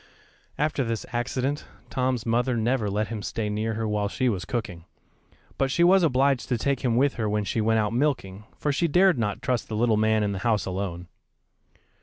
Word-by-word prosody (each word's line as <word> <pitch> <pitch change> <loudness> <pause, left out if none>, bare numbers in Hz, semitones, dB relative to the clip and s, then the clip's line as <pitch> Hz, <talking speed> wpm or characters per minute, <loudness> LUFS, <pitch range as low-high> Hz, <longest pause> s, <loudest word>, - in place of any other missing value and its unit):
After 150 -2 0
this 115 -2 -3
accident, 130 +4 -1 0.3
Tom's 130 -3 -1
mother 120 +2 +1
never 115 -1 0
let 105 +1 -1
him 110 -2 -4
stay 105 +1 -3
near 110 +1 -2
her 110 0 -2
while 105 -1 0
she 125 +4 0
was 95 -4 -2
cooking, 100 -9 -4 0.7
but 135 - +2
she 170 +6 +2
was 190 +2 +6
obliged 135 -4 +2
to 125 - +1
take 135 +3 0
him 120 -3 0
with 135 +3 +3
her 110 - 0
when 105 0 0
she 110 +2 -1
went 110 +1 +2
out 105 0 0
milking, 115 -7 -1
for 150 - 0
she 170 +5 +1
dared 180 -2 +4
not 105 +1 -2
trust 125 -3 -1
the 110 - -3
little 110 0 +2
man 110 0 +2
in 100 - 0
the 100 - -3
house 105 -2 +1
alone. 90 -2 -4
115 Hz, 205 wpm, -26 LUFS, 105-130 Hz, 0.7 s, was